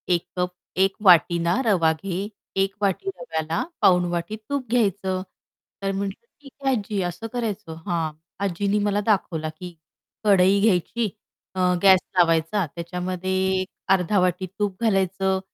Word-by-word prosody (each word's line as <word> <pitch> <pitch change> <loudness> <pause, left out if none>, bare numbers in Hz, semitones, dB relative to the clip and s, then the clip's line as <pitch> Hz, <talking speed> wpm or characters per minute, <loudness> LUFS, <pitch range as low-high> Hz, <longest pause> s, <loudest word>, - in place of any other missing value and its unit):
एक 170 - -3
कप 180 0 0 0.3
1 195 0 +3
वाटी 175 -1 +6
ना 170 +9 +1
रवा 175 -7 +4
घे, 195 +1 -3 0.3
1 195 0 +1
वाटी 200 - 0
रव्याला 160 -8 -2 0.2
पाऊण 180 -1 +5
वाटी 175 +5 -2
तूप 280 -4 -2
घ्यायचं." 195 -5 +1 0.6
तर 195 - 0
म्हटलं, 200 +3 -4 0.2
"ठीक 275 -2 -14
आहे, 270 -1 +3
आज्जी." 205 -2 -2
असं 175 +6 -4
करायचं 210 -9 -3
हां. 165 -3 0 0.3
आजींनी 200 +3 0
मला 205 0 +1
दाखवला 165 -7 0
की 180 -1 -7 0.5
कढई 195 -1 +5
घ्यायची 215 +2 +1 0.5
अ, 185 - -3 0.2
गॅस 190 -2 +8 0.2
लावायचा 165 +3 +3
त्याच्यामध्ये 180 +2 -4 0.3
एक 185 - -4 0.3
अर्धा 190 +2 +2
वाटी 180 +1 +1
तूप 205 +1 -2
घालायचं, 190 -2 +1
190 Hz, 145 wpm, -24 LUFS, 175-205 Hz, 0.6 s, गॅस